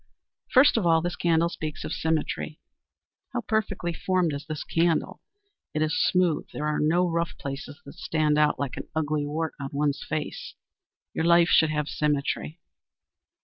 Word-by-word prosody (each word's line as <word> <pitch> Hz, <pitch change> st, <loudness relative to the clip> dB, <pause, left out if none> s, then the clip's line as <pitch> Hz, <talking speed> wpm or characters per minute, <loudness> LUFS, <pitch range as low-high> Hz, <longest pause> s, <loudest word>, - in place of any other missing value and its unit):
First 260 Hz, -1 st, +6 dB
of 210 Hz, -, +1 dB
all 165 Hz, -1 st, +5 dB
this 175 Hz, 0 st, -2 dB
candle 170 Hz, -1 st, +2 dB
speaks 155 Hz, -3 st, -5 dB
of -, -, -4 dB
Symmetry. 155 Hz, -1 st, -2 dB, 0.7 s
How 245 Hz, -, -1 dB
perfectly 210 Hz, -6 st, -1 dB
formed 180 Hz, -2 st, 0 dB
is 140 Hz, +2 st, -6 dB
this 155 Hz, -2 st, -4 dB
candle! 165 Hz, 0 st, 0 dB, 0.5 s
It 155 Hz, -, +2 dB
is 155 Hz, +1 st, 0 dB
smooth, 180 Hz, -4 st, +2 dB
there 150 Hz, -, -4 dB
are 150 Hz, 0 st, 0 dB
no 170 Hz, +4 st, +3 dB
rough 170 Hz, 0 st, -2 dB
places 140 Hz, +1 st, -6 dB
that 140 Hz, -, -10 dB
stand 155 Hz, -2 st, 0 dB
out 150 Hz, 0 st, +3 dB
like 140 Hz, -2 st, -3 dB
an -, -, -6 dB
ugly 150 Hz, -1 st, 0 dB
wart 160 Hz, +2 st, -2 dB
on 135 Hz, -1 st, -4 dB
one's 145 Hz, 0 st, 0 dB
face. 155 Hz, -1 st, -4 dB, 0.6 s
Your 160 Hz, -, -1 dB
life 170 Hz, 0 st, +5 dB
should 160 Hz, -, +5 dB
have 150 Hz, -1 st, -1 dB
symmetry. 150 Hz, +2 st, -1 dB
155 Hz, 165 wpm, -26 LUFS, 150-170 Hz, 0.7 s, First